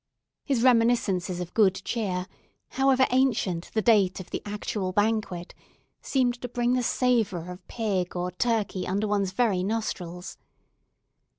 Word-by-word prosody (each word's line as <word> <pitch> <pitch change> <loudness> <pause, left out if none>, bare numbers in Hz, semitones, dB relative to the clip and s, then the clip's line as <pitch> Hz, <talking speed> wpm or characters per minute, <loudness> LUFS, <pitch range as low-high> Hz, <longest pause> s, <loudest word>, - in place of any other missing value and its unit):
His 260 -5 0
reminiscences 230 -8 +2
of 180 -1 -6
good 200 -4 +4
cheer, 190 -6 -2 0.4
however 265 -1 +3
ancient 230 -10 +1
the 220 - +2
date 200 -5 +3
of 185 - -10
the - - -3
actual 205 -2 -3
banquet, 205 -3 -1 0.5
seemed 245 -3 0
to 245 - -3
bring 245 0 0
the 255 - +2
savour 225 -9 0
of 180 -1 -12
pig 195 -7 -2
or 180 0 -2
turkey 210 -2 -1
under 200 +3 0
one's 200 -2 0
very 200 -3 +1
nostrils. 185 -4 -4
210 Hz, 135 wpm, -26 LUFS, 185-240 Hz, 0.5 s, good